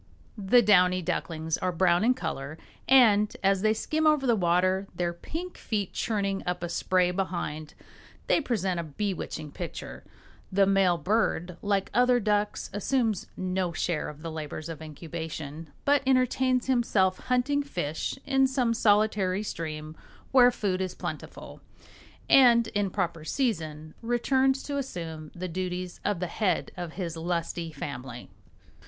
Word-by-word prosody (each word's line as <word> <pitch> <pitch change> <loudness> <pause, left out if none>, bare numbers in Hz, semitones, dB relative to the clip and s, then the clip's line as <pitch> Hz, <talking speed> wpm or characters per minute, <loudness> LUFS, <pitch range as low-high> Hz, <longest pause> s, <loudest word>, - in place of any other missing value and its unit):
The 225 +3 +4
downy 180 -3 +4
ducklings 160 -2 -2
are 185 - 0
brown 175 +1 +3
in 250 +3 +4
color 155 - -5 0.3
and, 215 -6 +5
as 195 -1 +3
they 215 +1 +3
skim 310 +7 0
over 300 -3 +3
the 240 -3 +4
water, 185 +1 +2
their 175 0 -1
pink 335 - -7
feet 205 -4 -2
churning 200 -3 -1
up 180 -1 -2
a 175 - -2
spray 180 +1 +1
behind, 170 -5 -4 0.5
they - - +3
present 195 - -1
a - - -2
bewitching 160 -2 -4
picture. 60 - -7 0.5
The 195 +1 +4
male 195 -3 +3
bird, 180 0 0
like 200 -1 0
other 250 0 +4
ducks, 210 -1 -1
assumes 225 0 0
no 185 -1 -1
share 165 0 -1
of 150 +1 -11
the 165 - -4
labors 155 0 -6
of 160 -1 -7
incubation, 160 -1 -7 0.2
but 285 0 +4
entertains 255 -1 +2
himself 215 -7 +2
hunting 260 +3 +2
fish 175 - -3
in 270 -1 +3
some 255 -3 +1
solitary 210 -3 +2
stream 155 -5 -5 0.4
where 250 -2 +7
food 195 -6 -1
is 185 -1 -3
plentiful, - - -7 0.7
and 235 -3 +6
in 205 -1 0
proper 175 -5 -2
season 155 - -2
returns 260 +3 +1
to 285 -1 -3
assume 165 - -6
the 185 +1 -4
duties 180 0 -4
of 205 -4 0
the 180 - -1
head 180 +1 -1
of 175 -3 -6
his 170 -3 -4
lusty 170 0 -3
family. 125 -4 -7
185 Hz, 145 wpm, -28 LUFS, 165-230 Hz, 0.7 s, where